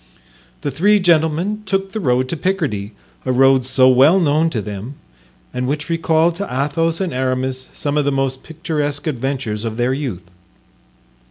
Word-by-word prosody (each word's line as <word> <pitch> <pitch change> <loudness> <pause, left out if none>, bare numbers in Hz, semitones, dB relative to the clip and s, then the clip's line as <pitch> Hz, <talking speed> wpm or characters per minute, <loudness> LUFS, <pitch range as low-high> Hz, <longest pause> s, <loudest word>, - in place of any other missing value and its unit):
The 145 - -2
three 205 +10 +3
gentlemen 170 +4 +1
took 195 0 -1
the 220 - -3
road 130 -7 +1
to - - -1
Picardy, 150 - -2 0.3
a 130 - -1
road 130 0 +4
so 130 0 +4
well 135 +8 +6
known 160 0 +2
to 125 - -3
them 105 +6 -6 0.6
and 125 0 -2
which 150 +3 -3
recalled 165 0 +2
to 200 +1 -3
Athos 150 +5 0
and 185 -4 -2
Aramis 130 0 -2
some 145 0 -2
of 145 - +2
the 140 - +2
most 135 -1 -1
picturesque 150 -3 -3
adventures 130 -6 -3
of 115 -1 -4
their 125 +2 +1
youth. 125 - -4
140 Hz, 165 wpm, -19 LUFS, 130-165 Hz, 0.6 s, well